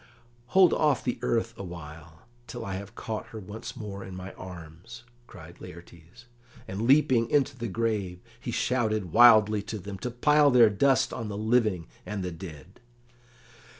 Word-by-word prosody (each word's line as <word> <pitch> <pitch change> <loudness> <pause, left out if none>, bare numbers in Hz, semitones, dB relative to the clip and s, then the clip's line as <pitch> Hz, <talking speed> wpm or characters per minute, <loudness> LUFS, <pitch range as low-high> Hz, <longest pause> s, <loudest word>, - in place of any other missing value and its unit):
"Hold 185 -3 +7
off 150 -4 +1
the 120 -1 -2
earth 115 -2 0
awhile, 80 -3 -10 0.2
till 120 -3 -7
I 100 - -4
have 100 +4 -7
caught 110 -2 -5
her 110 - -9
once 110 +4 -8
more 100 -3 -7
in 95 - -9
my 95 +1 -8
arms," 90 +5 -11 0.2
cried 85 -2 -13
Laertes; 85 +3 -13 0.4
and, 105 +5 -3
leaping 130 -4 +4
into 145 -1 +1
the 120 -2 -5
grave, 105 -4 -2 0.2
he - - -7
shouted 110 -7 -1
wildly 110 -2 +6
to 110 +2 -6
them 100 0 -8
to 125 - -4
pile 145 +4 +4
their 120 -4 +6
dust 135 +5 +2
on 115 -3 -5
the 100 -1 -5
living 110 -5 +1 0.2
and 100 0 -5
the 90 - -3
dead. 85 0 -11
105 Hz, 160 wpm, -27 LUFS, 90-120 Hz, 0.4 s, Hold